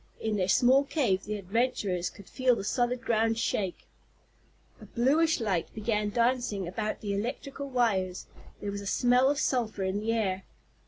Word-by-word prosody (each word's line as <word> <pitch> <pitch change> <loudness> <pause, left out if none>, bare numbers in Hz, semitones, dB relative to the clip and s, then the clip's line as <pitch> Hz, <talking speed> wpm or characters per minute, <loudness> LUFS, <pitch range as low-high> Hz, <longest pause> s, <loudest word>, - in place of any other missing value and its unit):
In 220 -1 -1
their 185 -3 0
small 255 +7 +5
cave 235 - 0
the 210 - -3
adventurers 200 -3 -1
could 200 - -15
feel 255 -2 +2
the 195 - -5
solid 245 +3 0
ground 225 0 +1
shake. 195 -5 -2 1.0
A - - -10
bluish 300 +7 +2
light 195 -7 -1
began 210 -1 0
dancing 235 -4 0
about 210 +4 -3
the 205 -2 -2
electrical 275 +6 -4
wires. 200 -8 0 0.4
There 205 - -3
was 200 0 -5
a 200 - -7
smell 250 +5 +3
of 290 - +1
sulphur 225 -8 0
in 190 +2 -1
the 225 +2 -1
air. 195 -4 -1
220 Hz, 165 wpm, -29 LUFS, 200-250 Hz, 1.0 s, small